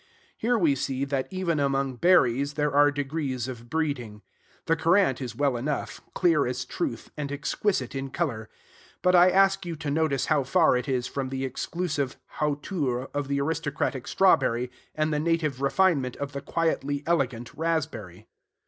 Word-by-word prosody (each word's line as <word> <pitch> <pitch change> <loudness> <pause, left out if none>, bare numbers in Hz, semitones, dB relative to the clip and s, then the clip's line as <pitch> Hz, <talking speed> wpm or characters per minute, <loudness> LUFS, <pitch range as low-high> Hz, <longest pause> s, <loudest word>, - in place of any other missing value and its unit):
Here 240 +2 +1
we 165 -8 +3
see, 135 0 -2
that, 135 -1 -2
even 185 -5 -1
among 135 -2 0
berries, 140 -5 +3
there 150 -2 0
are 145 +1 +6
degrees 140 -3 -3
of 120 -2 -8
breeding. 125 -9 -2 0.4
The 165 - +3
currant 165 -4 +3
is 120 -4 -5
well 140 0 +1
enough, 140 +5 -3
clear 165 -7 +3
as 125 +1 -3
truth, 115 -1 -4
and 145 -2 -4
exquisite 145 - -1
in 135 0 -4
color; 125 -8 -3 0.5
but 180 - +4
I 180 0 +7
ask 195 +1 +3
you 170 -2 -4
to 150 -2 -4
notice 150 -3 +1
how 150 -3 +2
far 160 +2 +3
it 125 +2 -2
is 125 -2 0
from 135 0 -3
the 135 0 -3
exclusive 145 0 -3 0.2
hauteur 145 -4 -1
of 145 -1 -2
the 140 0 0
aristocratic 150 -3 -2
strawberry, 125 -10 +3 0.2
and 155 0 0
the 150 - +1
native 155 -4 0
refinement 140 -3 +2
of 140 0 -5
the 140 -1 -5
quietly 145 -2 -1
elegant 125 -8 -1
raspberry. 145 - -3
140 Hz, 165 wpm, -26 LUFS, 130-160 Hz, 0.5 s, I